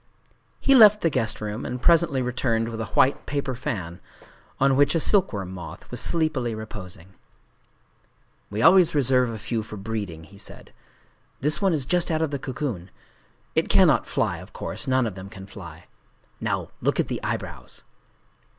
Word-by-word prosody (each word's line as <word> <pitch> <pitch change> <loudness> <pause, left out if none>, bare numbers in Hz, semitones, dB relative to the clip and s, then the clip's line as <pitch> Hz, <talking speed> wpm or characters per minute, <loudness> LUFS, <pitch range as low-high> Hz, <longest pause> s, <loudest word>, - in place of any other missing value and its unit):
He 275 - +4
left 215 -4 +8
the 165 - +2
guest 115 -5 -1
room, 105 +2 -4
and 125 - -4
presently 160 -2 +3
returned 115 -2 0
with 115 -1 -5
a 110 - -4
white 135 - +3
paper 140 -2 -2
fan, 105 - -5 0.6
on 135 0 +4
which 145 +3 +3
a - - +3
silkworm 115 - +1
moth 90 -2 -9
was - - -2
sleepily 150 -9 0
reposing. 95 -4 -9 1.4
"We 105 +3 -2
always 185 -5 +6
reserve 130 -3 +3
a 115 - -5
few 110 +2 -3
for 105 0 -9
breeding," 100 -6 -5
he 100 +4 -16
said;—"this 150 +8 -6
one 195 -2 +3
is 150 -5 0
just 175 +5 +1
out 160 -1 +1
of 155 - -1
the 140 - -3
cocoon. 125 - -4 0.6
It - - +1
cannot - - +4
fly, - - -1
of - - -13
course: 145 - -5
none 130 -1 +2
of 110 - -3
them 95 +1 -9
can 95 -2 -10
fly…. 90 -5 -11 0.5
Now - - -2
look - - 0
at - - +2
the - - -4
eyebrows." - - -5
125 Hz, 170 wpm, -24 LUFS, 105-145 Hz, 1.4 s, left